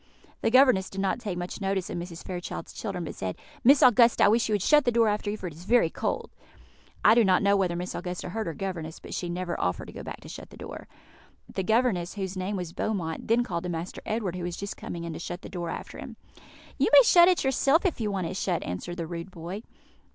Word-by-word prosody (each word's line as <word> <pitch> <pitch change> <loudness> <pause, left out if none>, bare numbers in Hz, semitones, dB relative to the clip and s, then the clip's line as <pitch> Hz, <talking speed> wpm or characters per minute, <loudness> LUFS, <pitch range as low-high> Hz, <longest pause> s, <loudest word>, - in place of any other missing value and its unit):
The - - +2
governess 255 -6 +5
did 195 - -7
not 195 +4 0
take 205 -6 -4
much 175 +3 -5
notice 195 -2 -1
of - - -4
Mrs. 170 -1 -8
Fairchild's 180 -1 -6
children, 195 -5 -4
but 160 - -5
said, 95 -1 -4 0.3
"Miss 275 +3 +6
Augusta, 240 -1 +6
I - - +7
wish 225 +1 +2
you - - +1
would 200 - -1
shut 300 -1 +5
the 245 - +2
door 230 -1 +4
after 210 0 0
you, 210 - -2
for 190 - -8
it 170 - -5
is 165 +4 -13
very 230 -7 +4
cold." - - -3 0.7
I 215 - +9
do 235 0 +5
not 185 -1 +3
know 200 0 +4
whether 185 -3 +1
Miss 180 +1 -4
Augusta 180 0 -5
heard 220 +2 -3
her 165 - -4
governess, 170 -4 -5
but - - -9
she 175 - -3
never 175 0 -3
offered 90 0 -1
to - - -10
go - - -7
back - - -7
to - - -12
shut - - -9
the - - -14
door. - - -8 0.7
The - - -1
governess, 220 -4 +1
whose 190 -2 -4
name 190 +2 -2
was 180 -3 -5
Beaumont, 175 -6 -3
then 235 +2 +3
called 170 -7 -3
to - - -2
Master 170 +1 -5
Edward, 215 -5 -1
who 180 - -5
was 175 0 -4
just 200 0 -5
coming 170 -1 -6
in, 170 -1 -5
to - - -6
shut 175 +2 -6
the - - -8
door 175 -2 -4
after - - -6
him. - - -8 0.6
"You - - +4
may - - +9
shut 350 -6 +7
it 365 -1 +3
yourself, 275 - +3
if 340 -9 0
you 215 - 0
want 195 -3 -2
it 180 - -4
shut," 180 -3 -1
answered 130 - -5
the 170 - -3
rude 170 +2 -6
boy. 180 +3 -7
190 Hz, 255 wpm, -27 LUFS, 175-220 Hz, 0.7 s, I